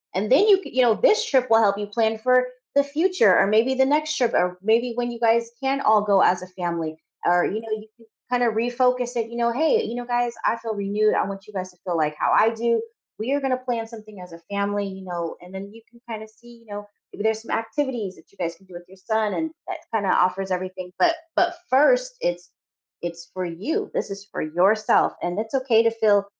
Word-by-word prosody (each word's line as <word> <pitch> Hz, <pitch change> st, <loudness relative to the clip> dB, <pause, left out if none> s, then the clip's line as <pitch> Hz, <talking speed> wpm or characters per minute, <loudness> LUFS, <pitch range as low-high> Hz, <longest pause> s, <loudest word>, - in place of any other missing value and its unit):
And 205 Hz, +4 st, -1 dB
then 340 Hz, +11 st, +6 dB
you 395 Hz, -3 st, +7 dB
could 345 Hz, -, -11 dB
you 260 Hz, -, +4 dB
know, 240 Hz, -3 st, +5 dB
this 455 Hz, -2 st, +3 dB
trip 260 Hz, -, +2 dB
will 225 Hz, 0 st, +6 dB
help 200 Hz, -2 st, +3 dB
you 205 Hz, 0 st, -4 dB
plan 220 Hz, +1 st, 0 dB
for 255 Hz, +2 st, +3 dB, 0.3 s
the 280 Hz, -, +5 dB
future 295 Hz, -, +3 dB
or -, -, +4 dB
maybe 225 Hz, +5 st, +3 dB
the 265 Hz, 0 st, +4 dB
next 305 Hz, +2 st, +1 dB
trip 245 Hz, -3 st, +1 dB
or 180 Hz, 0 st, +1 dB
maybe 230 Hz, +4 st, +2 dB
when 240 Hz, 0 st, -2 dB
you 235 Hz, -, -8 dB
guys 230 Hz, 0 st, +2 dB
can 270 Hz, +1 st, 0 dB
all 215 Hz, -4 st, +4 dB
go 200 Hz, -2 st, +3 dB
as 180 Hz, 0 st, +3 dB
a 185 Hz, -, -8 dB
family 170 Hz, -3 st, -4 dB, 0.3 s
or, 175 Hz, 0 st, +4 dB
you 215 Hz, -, -2 dB
know, 225 Hz, -, -10 dB
you 215 Hz, 0 st, -4 dB
can 230 Hz, -, -21 dB, 0.3 s
kinda 245 Hz, -, +3 dB
refocus 245 Hz, +1 st, +1 dB
it, 230 Hz, -1 st, -2 dB
you 235 Hz, -, -9 dB
know, 235 Hz, 0 st, +1 dB
"Hey, 320 Hz, -, +2 dB
you -, -, -5 dB
know, 245 Hz, 0 st, -5 dB
guys, 240 Hz, -1 st, 0 dB
I -, -, +3 dB
feel 230 Hz, -1 st, -5 dB
renewed. 205 Hz, +1 st, +1 dB
I -, -, +1 dB
want 195 Hz, 0 st, -7 dB
you -, -, -12 dB
guys 185 Hz, -1 st, -4 dB
to 180 Hz, -, -28 dB
feel 175 Hz, -2 st, -1 dB
like 150 Hz, -1 st, 0 dB
how -, -, 0 dB
I 220 Hz, -, +5 dB
do. 230 Hz, 0 st, 0 dB, 0.4 s
We 235 Hz, +6 st, -1 dB
are 285 Hz, -, +1 dB
going 270 Hz, -1 st, -1 dB
to 255 Hz, -, +2 dB
plan 245 Hz, -3 st, -3 dB
something 215 Hz, -3 st, -13 dB
as 180 Hz, -1 st, -12 dB
a 165 Hz, -, -11 dB
family." 200 Hz, 0 st, -1 dB
You 190 Hz, 0 st, -9 dB
know, 170 Hz, -2 st, -4 dB
and 180 Hz, +1 st, -14 dB
then 195 Hz, +1 st, -7 dB
you 225 Hz, +1 st, -15 dB
can 235 Hz, -, -21 dB
kind 220 Hz, -1 st, -6 dB
of 220 Hz, -, -13 dB
see, 235 Hz, +2 st, -18 dB
you 230 Hz, -, -23 dB
know, 205 Hz, 0 st, -8 dB, 0.3 s
maybe -, -, -6 dB
there's 220 Hz, 0 st, +1 dB
some 225 Hz, -, -10 dB
activities 225 Hz, -5 st, -2 dB
that 160 Hz, -, -21 dB
you 200 Hz, -, -27 dB
guys 170 Hz, -1 st, -3 dB
can 195 Hz, -, -24 dB
do 185 Hz, -, -16 dB
with 175 Hz, 0 st, -11 dB
your 190 Hz, -, -16 dB
son 220 Hz, +2 st, -1 dB
and 320 Hz, -1 st, -2 dB, 0.2 s
that -, -, -5 dB
kind 215 Hz, -3 st, 0 dB
of 190 Hz, -, +3 dB
offers 190 Hz, +1 st, +1 dB
everything. 185 Hz, 0 st, -4 dB
But 335 Hz, -1 st, +4 dB, 0.2 s
but 350 Hz, 0 st, +2 dB
1st, -, -, +3 dB
it's 175 Hz, 0 st, -3 dB, 0.5 s
it's 170 Hz, 0 st, -7 dB
for 185 Hz, -, -3 dB
you, 295 Hz, -, -3 dB
this -, -, -2 dB
is 195 Hz, 0 st, -7 dB
for -, -, -6 dB
yourself. 190 Hz, +7 st, +2 dB
And 175 Hz, +1 st, -3 dB
it's 220 Hz, +3 st, -9 dB
okay 250 Hz, -4 st, +3 dB
to 230 Hz, -, +3 dB
feel 210 Hz, -3 st, +3 dB
220 Hz, 255 wpm, -23 LUFS, 190-245 Hz, 0.5 s, you